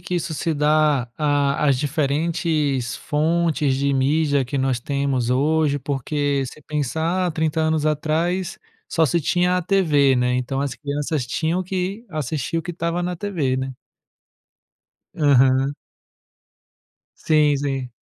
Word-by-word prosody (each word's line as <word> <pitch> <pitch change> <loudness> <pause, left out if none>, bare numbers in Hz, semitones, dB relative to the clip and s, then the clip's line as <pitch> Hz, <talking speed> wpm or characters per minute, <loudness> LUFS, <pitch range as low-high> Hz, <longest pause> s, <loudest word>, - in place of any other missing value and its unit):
que 180 - -3
isso 165 -2 -3
se 165 - -1
dá 150 -3 +2
à 145 -1 +1
às 130 -2 +3
diferentes 145 -3 0
fontes 155 -2 0
de 140 0 0
mídia 140 +1 +2
que 135 +3 -3
nós 130 -2 0
temos 140 -2 -1
hoje, 145 +2 +2
porque, 140 +1 -1
se 135 +4 -9
pensar 160 +6 -1
há - - 0
30 160 0 -1
anos 155 -1 +1
atrás, 165 +5 -1 0.3
só 160 -1 +2
se 170 +6 +1
tinha 180 +4 +1
a 180 - -3
TV, 155 -8 +3
né, 125 0 +1
então 130 +2 -2
as 140 -1 -2
crianças 145 -1 -2
tinham 165 +8 -1
que 190 +4 -3
assistir 155 0 -2
o 165 - -4
que 175 - -5
estava 170 +1 -2
na 180 0 -2
TV, 165 -9 -1
né? 130 -1 -4 1.4
Aham. 135 -1 +3 1.4
Sim 150 -2 +3
sim. 135 -3 -3
150 Hz, 140 wpm, -22 LUFS, 135-165 Hz, 1.4 s, às